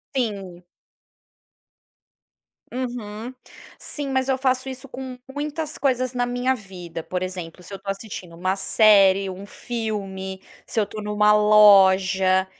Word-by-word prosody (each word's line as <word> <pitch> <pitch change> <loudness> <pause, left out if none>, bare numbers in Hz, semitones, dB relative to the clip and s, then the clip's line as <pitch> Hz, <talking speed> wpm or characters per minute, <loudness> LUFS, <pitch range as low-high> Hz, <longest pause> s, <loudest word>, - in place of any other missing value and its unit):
Sim. 195 -8 -3 2.1
Uhum, 240 -2 -5 0.5
sim, 290 -2 -2
mas 260 0 0
eu 265 -1 +1
faço 260 0 0
isso 260 +1 -7
com 255 -1 -7 0.2
muitas 300 +2 -4
coisas 255 -2 0
na 245 -1 0
minha 245 +2 0
vida, 180 -7 -8
por 180 +3 -4
exemplo, 180 -1 -7
se 200 - -11
eu 195 - -5
estou 195 - -9
assistindo 195 -4 -6
uma 185 +3 -1
série, 195 -2 +5
um 190 +2 -8
filme. 195 -4 -5 0.2
Se - - -8
eu - - +3
estou 210 +1 -7
em 210 - -7
uma 210 0 +3
loja, 190 -3 +5
210 Hz, 140 wpm, -23 LUFS, 190-250 Hz, 2.1 s, série